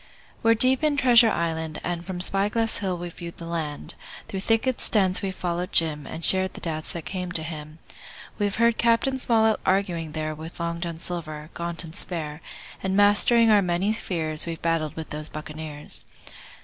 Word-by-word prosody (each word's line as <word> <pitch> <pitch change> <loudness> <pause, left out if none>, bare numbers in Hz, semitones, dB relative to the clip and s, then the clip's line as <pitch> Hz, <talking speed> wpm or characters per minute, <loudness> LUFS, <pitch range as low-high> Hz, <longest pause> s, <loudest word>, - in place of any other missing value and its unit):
We're 230 0 +4
deep 255 +5 +5
in 300 -2 +2
Treasure 240 -4 +7
Island, 160 -4 -2
and 175 -1 -3
From 180 -1 -5
Spy 195 +2 +2
Glass 225 +1 +1
Hill 185 -3 -2
we've 175 0 -6
viewed 170 -1 -8
the 170 - -7
land; 160 -3 -2 0.3
Through 195 - -4
thickets 225 +5 +1
dense 190 -4 +3
we've 190 -1 -3
followed 175 0 -3
Jim 150 -3 +1
And 165 - 0
shared 190 0 +5
the - - -7
doubts 155 -2 -3
that 170 -2 -6
came 180 -2 -4
to 160 - 0
him. 155 -1 -8 0.6
We've 205 -1 0
heard 235 0 +2
Cap. 230 0 +3
Smollett 230 -5 +2
arguing 175 -5 0
there 155 -1 -3
With 160 +3 -9
Long 170 0 -3
John 170 -2 -4
Silver, 155 -3 -6
gaunt 170 0 -3
and 160 -1 -10
spare, 160 -3 -3 0.4
And 190 0 -1
mastering 220 +3 +5
our 210 -1 +6
many 185 +3 0
fears 160 -7 -1
We've 165 -1 -4
battled 165 -3 -1
with 160 -1 -7
those 150 +1 -5
buccaneers. 155 -1 -7
175 Hz, 185 wpm, -25 LUFS, 160-205 Hz, 0.6 s, Treasure